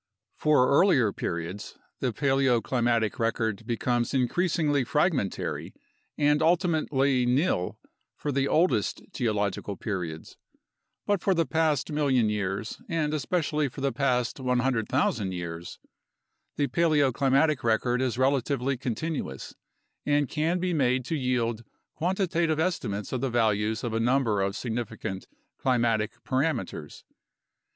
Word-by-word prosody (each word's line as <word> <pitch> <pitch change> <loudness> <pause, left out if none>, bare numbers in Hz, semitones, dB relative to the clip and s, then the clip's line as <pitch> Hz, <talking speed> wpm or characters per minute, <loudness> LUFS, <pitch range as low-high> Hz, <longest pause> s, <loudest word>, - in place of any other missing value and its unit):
For 150 -4 +3
earlier 140 - +4
periods, 85 +4 -5 0.2
the 125 - 0
paleoclimatic 120 -3 +1
record 115 -1 -1
becomes 120 +1 0
increasingly 145 +1 +1
fragmentary 145 - -1 0.4
and 150 0 +3
ultimately 155 -7 +2
nil 125 - +1 0.4
for 145 - -3
the 135 0 +1
oldest 170 +6 +1
geological 105 -4 -1
periods. 90 -7 -5 0.7
But 205 -3 +1
for 195 - +2
the 165 -1 +2
past 160 -3 0
million 135 -7 +2
years, 105 - -3
and 155 -3 0
especially 150 0 0
for 135 - -9
the 140 0 +1
past 125 -3 0
100,000 125 -6 0
years, 85 -1 -6 0.8
the 145 - +1
paleoclimatic 145 -2 +2
record 120 +2 +1
is 125 -2 -1
relatively 135 0 +1
continuous 125 - -4 0.5
and 145 -1 +2
can 160 +5 0
be 180 0 -1
made 130 -4 +1
to 160 - -2
yield 120 -4 -1 0.3
quantitative 170 -3 0
estimates 120 - -2
of 130 - -1
the 135 - 0
values 110 -2 +1
of 120 -2 -2
a 115 - 0
number 115 -3 +2
of 100 0 -1
significant 110 -5 -4 0.3
climatic 120 -2 0
parameters. 130 - -2
130 Hz, 115 wpm, -27 LUFS, 115-150 Hz, 0.8 s, earlier